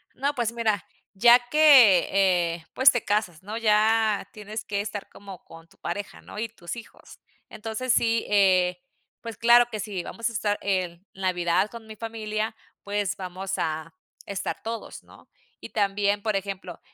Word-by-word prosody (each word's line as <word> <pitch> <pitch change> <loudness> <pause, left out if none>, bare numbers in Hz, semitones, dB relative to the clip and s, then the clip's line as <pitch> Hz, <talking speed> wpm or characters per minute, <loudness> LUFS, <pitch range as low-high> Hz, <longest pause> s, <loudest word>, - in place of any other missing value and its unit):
No 280 +2 -1
pues, 235 -2 -1
mira 220 -5 -1 0.3
ya 240 +5 +7
que, 265 - +7 0.5
eh, 165 -1 -13
pues 260 +1 +6
te 245 - -2
casas, 195 -6 -1
¿no? 215 +3 -5
Ya 215 -1 +2
tienes 215 +1 -7
que 200 -1 -3
estar 205 0 -5
como 195 -3 -12
con 165 0 -15
tu - - -25
pareja, 200 +4 -6
¿no? - - -9
Y 225 0 -3
tus 175 -4 -8
hijos. 230 -1 -13 0.3
Entonces 225 +3 -3
sí, 230 0 +2
eh, 185 -2 +3 0.4
pues, 230 -2 -7
claro 240 +1 +6
que 215 - -5
sí. 200 -3 -4
Vamos 230 0 -3
a 230 - -9
estar 205 -1 0
en 185 -2 -2
Navidad 185 0 0
con 230 -1 -11
mi 220 - -9
familia, 220 0 -4 0.3
pues, 205 -2 -2
vamos 190 +1 -6
a 160 +1 -3 0.3
estar 200 -2 -4
todos, 230 0 -6
¿no? - - -19 0.3
Y - - -9
también, 205 -1 0
por 215 -1 -1
ejemplo, 190 -3 -5
210 Hz, 165 wpm, -25 LUFS, 190-225 Hz, 0.5 s, ya